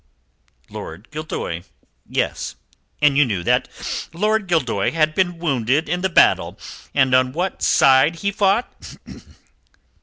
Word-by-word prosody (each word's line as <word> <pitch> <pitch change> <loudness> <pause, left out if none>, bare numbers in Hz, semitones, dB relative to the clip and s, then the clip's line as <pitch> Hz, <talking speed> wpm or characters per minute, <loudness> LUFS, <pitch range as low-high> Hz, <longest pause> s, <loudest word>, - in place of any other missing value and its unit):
"Lord 85 +8 -9
Gildoy 150 - -5 0.5
yes." - - -2 0.5
"And 145 -1 +4
you - - +7
knew 100 -9 -2
that - - +1 0.4
Lord 210 +4 0
Gildoy 130 - 0
had 155 -1 +2
been 175 0 0
wounded 140 -2 0
in 175 +3 -2
the 190 - 0
battle, 170 - +3 0.4
and 130 -2 +3
on 130 0 +3
what 180 +4 -3
side 135 +4 +4
he 200 +4 -2
fought?" 200 +4 -1
155 Hz, 125 wpm, -20 LUFS, 130-180 Hz, 0.5 s, you